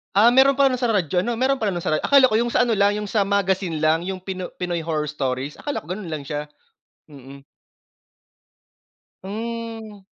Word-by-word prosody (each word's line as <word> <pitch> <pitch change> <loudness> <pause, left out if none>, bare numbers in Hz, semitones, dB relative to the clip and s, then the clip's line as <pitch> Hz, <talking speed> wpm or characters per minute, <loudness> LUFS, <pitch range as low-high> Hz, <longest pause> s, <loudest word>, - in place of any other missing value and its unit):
Ah, 220 +4 +6
meron 265 +2 +5
pala 275 -1 +4
nung 255 - -2
sa 245 - +2
radyo 180 -4 +1
ano, 235 +6 -1
meron 260 +3 +1
pala 215 -3 0
nung 175 -1 -4
sa - - -1
ra 155 - +2
akala 275 -2 +5
ko - - +2
yung 240 0 0
sa - - +4
ano 240 -2 +1
lang 200 +1 +3
yung 210 -1 -4
sa 205 -3 +1
magazine 190 -5 0
lang 160 +2 +2
yung 190 -1 -5
pino 185 -1 -5
Pinoy 175 -1 -3
Horror 155 -2 -2
Stories, 135 -1 -3
akala 290 - -4
ko - - -18
ganun 190 0 -5
lang 155 -3 -5
siya, 150 +1 -5 0.6
mm. 140 -1 -13 1.8
Hmm. 225 +1 -6
195 Hz, 200 wpm, -22 LUFS, 160-230 Hz, 1.8 s, Ah